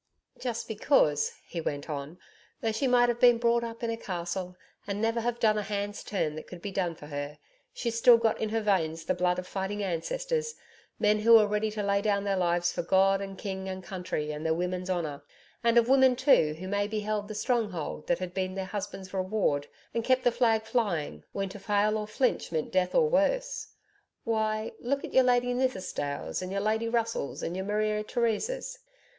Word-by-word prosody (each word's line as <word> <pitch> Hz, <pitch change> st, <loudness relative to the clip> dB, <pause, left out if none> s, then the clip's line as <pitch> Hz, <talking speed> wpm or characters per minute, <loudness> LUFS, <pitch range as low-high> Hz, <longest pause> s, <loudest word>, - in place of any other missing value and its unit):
Just 240 Hz, -3 st, -3 dB
because,' 205 Hz, -, +2 dB
he 170 Hz, -, -4 dB
went 145 Hz, -2 st, -3 dB
on, 150 Hz, +2 st, -5 dB, 0.4 s
'though 225 Hz, -, 0 dB
she 225 Hz, +5 st, 0 dB
might 245 Hz, -1 st, +5 dB
have 240 Hz, 0 st, -1 dB
been 245 Hz, -1 st, +7 dB
brought 235 Hz, 0 st, +2 dB
up 230 Hz, 0 st, -6 dB
in 230 Hz, -, 0 dB
a 230 Hz, -, -3 dB
castle 180 Hz, -2 st, -4 dB, 0.3 s
and 200 Hz, 0 st, -2 dB
never 225 Hz, +1 st, +1 dB
have 240 Hz, +1 st, -2 dB
done 215 Hz, -1 st, +3 dB
a -, -, -1 dB
hand's 205 Hz, 0 st, -3 dB
turn 160 Hz, -7 st, -1 dB
that 155 Hz, -, -8 dB
could 180 Hz, -, -9 dB
be 200 Hz, +3 st, -5 dB
done 180 Hz, -3 st, -1 dB
for 150 Hz, -, -12 dB
her, 145 Hz, 0 st, -5 dB, 0.3 s
she's 235 Hz, -2 st, -2 dB
still 240 Hz, 0 st, +8 dB
got 230 Hz, -1 st, 0 dB
in 220 Hz, -, 0 dB
her 225 Hz, +1 st, 0 dB
veins 165 Hz, -6 st, 0 dB
the -, -, +1 dB
blood 180 Hz, 0 st, +1 dB
of 180 Hz, -, -4 dB
fighting 200 Hz, +2 st, -3 dB
ancestors 465 Hz, -, -2 dB, 0.4 s
men 210 Hz, 0 st, +3 dB
who 230 Hz, +2 st, +5 dB
were 220 Hz, -2 st, +7 dB
ready 210 Hz, +1 st, 0 dB
to 210 Hz, -1 st, -3 dB
lay 200 Hz, 0 st, +2 dB
down 200 Hz, -1 st, +1 dB
their 200 Hz, -1 st, 0 dB
lives 175 Hz, -1 st, +1 dB
for -, -, -2 dB
God 195 Hz, +3 st, +3 dB
and 195 Hz, -1 st, -6 dB
King 190 Hz, -1 st, -4 dB
and 185 Hz, 0 st, -5 dB
country 180 Hz, -5 st, -3 dB
and 150 Hz, +1 st, -5 dB
their 160 Hz, 0 st, +1 dB
women's 180 Hz, +1 st, -2 dB
honour 155 Hz, -6 st, -2 dB, 0.4 s
and 235 Hz, 0 st, +4 dB
of 235 Hz, -1 st, +5 dB
women 260 Hz, -1 st, +5 dB
too 245 Hz, -, +4 dB
who'd 185 Hz, +4 st, -7 dB
maybe 205 Hz, +1 st, 0 dB
held 210 Hz, -1 st, -2 dB
the 215 Hz, -, -6 dB
stronghold 210 Hz, -, -2 dB
that 175 Hz, -, +2 dB
had 180 Hz, 0 st, -5 dB
been 185 Hz, 0 st, -2 dB
their 190 Hz, -1 st, -3 dB
husband's 190 Hz, -1 st, -6 dB
reward, 185 Hz, -7 st, 0 dB, 0.3 s
and 230 Hz, -, -1 dB
kept 255 Hz, +1 st, +2 dB
the 245 Hz, -, +4 dB
flag 225 Hz, -2 st, +2 dB
flying, 175 Hz, -, -1 dB
when 195 Hz, -1 st, -2 dB
to 205 Hz, -, -9 dB
fail 205 Hz, +2 st, +1 dB
or 210 Hz, -1 st, -2 dB
flinch 250 Hz, -2 st, 0 dB
meant 160 Hz, -2 st, -2 dB
death 185 Hz, -1 st, +1 dB
or 475 Hz, -, +5 dB
worse.... -, -, +1 dB, 0.6 s
Why, 220 Hz, -1 st, 0 dB
look 275 Hz, +3 st, -1 dB
at -, -, -7 dB
your 260 Hz, -1 st, +6 dB
Lady 245 Hz, 0 st, +3 dB
Nithisdales 190 Hz, -, -2 dB
and 185 Hz, 0 st, -5 dB
your 200 Hz, -, -1 dB
Lady 220 Hz, +2 st, 0 dB
Russells 230 Hz, -10 st, -1 dB
and 170 Hz, -, -3 dB
your 190 Hz, +1 st, -3 dB
Maria 210 Hz, +1 st, 0 dB
Theresas....' 245 Hz, -, -1 dB
205 Hz, 210 wpm, -29 LUFS, 180-230 Hz, 0.6 s, still